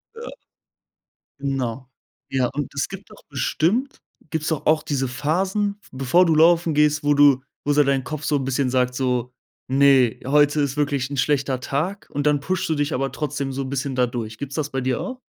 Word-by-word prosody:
Ja. 465 +1 -8 1.1
Genau. 130 -2 -3 0.4
Ja, 130 -2 +1
und 145 -1 -3
es 140 - -1
gibt 195 +1 -10
doch 215 - -16
bestimmt 185 - -1 0.3
gibt's 160 -1 -1
doch 160 -3 -2
auch 155 0 +3
diese 135 -2 -1
Phasen, 190 +10 -1
v - - -21
bevor 135 +8 +3
du 165 -2 +2
laufen 165 +1 +4
gehst, 150 0 +2
wo 145 0 +3
du 140 -2 +5 0.2
wo 145 - 0
so 150 +1 +5
dein 135 -1 +1
Kopf 155 +2 -6
so 150 - +1
'n 140 - 0
bisschen 130 0 0
sagt, 125 0 +1
so: 125 -1 -1 0.4
„Ne, 135 -3 +4
heute 145 +2 +3
ist 140 -2 0
wirklich 140 -3 -1
'n 140 - -4
schlechter 135 -2 +1
Tag.“ 165 +10 -3
Und 145 +1 -1
dann 145 -1 +2
pushst 185 +5 -2
du 160 - 0
dich 145 +1 -1
aber 135 +1 -1
trotzdem 145 -2 -3
so 135 - -3
'n 130 - -6
bisschen 135 0 -3
da 125 -1 +3
durch. 115 -3 -5
Gibt's 140 +2 -6
das 150 -2 -2
bei 135 - -2
dir 130 -1 -1
auch? 255 -1 -6
140 Hz, 205 wpm, -22 LUFS, 130-155 Hz, 1.1 s, du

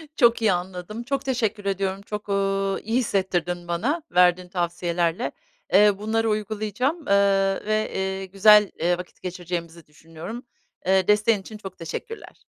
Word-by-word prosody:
Çok 235 -3 +4
iyi 220 -2 +4
anladım. 180 +5 -5
Çok 275 +2 -2
teşekkür 220 -6 -1
ediyorum, 195 0 -1
çok, 210 0 -7
ııı, 195 0 0
iyi 225 +4 +1
hissettirdin 180 -5 -1
bana 250 - -1
verdiğin 180 0 +3
tavsiyelerle. 175 -1 -1 0.4
Eee, 205 +2 +7
bunları 225 +1 0
uygulayacağım, 215 - -2
eee, 195 -1 +2
ve, 215 0 0
iii, 190 0 -3
güzel, 210 +1 +6
iii, 175 +1 +2
vakit 180 0 -10
geçireceğimizi 170 -2 -6
düşünüyorum. 165 - -9 0.4
Eee, 190 0 +3
desteğin 210 0 +3
için 215 +3 -10
çok 195 -3 -10
teşekkürler. 445 - -8
195 Hz, 140 wpm, -24 LUFS, 180-215 Hz, 0.4 s, Eee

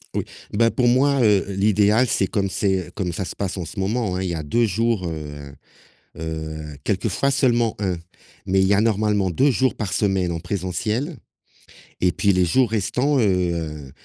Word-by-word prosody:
oui, - - 0 0.3
ben, 115 +2 +3
pour 125 -2 +1
moi, 135 +3 +3
heu, 105 -4 +4
l'idéal, 105 +4 +3
c'est 100 -3 +1
comme 100 -2 -1
c'est 95 -5 -1
comme 90 -4 -2
ça 95 +3 -4
se - - -7
passe 95 -1 -3
en 90 - -4
ce 95 - -8
moment, 100 0 -1
hein, 95 - -2
il 95 - -2
y 85 - -2
a 80 - -4
2 115 +11 +2
jours, 110 -1 0
heu 75 -3 -7 0.7
heu, 80 -1 -5
quelquefois 105 +6 0
seulement 120 -4 +2
1, 95 -4 -1 0.5
mais 95 +1 +2
il 95 - +4
y 100 - +4
a 100 - +3
normalement 105 -3 +1
2 135 - +3
jours 130 +1 +1
par 105 -5 -3
semaine 95 -4 +1
en 85 - -4
présentiel 100 - -2 0.9
et 90 -1 +3
puis 100 +4 +2
les 90 0 +3
jours 120 +7 +2
restants, 125 +7 +1
heu, 85 - -1
100 Hz, 190 wpm, -22 LUFS, 90-115 Hz, 0.9 s, heu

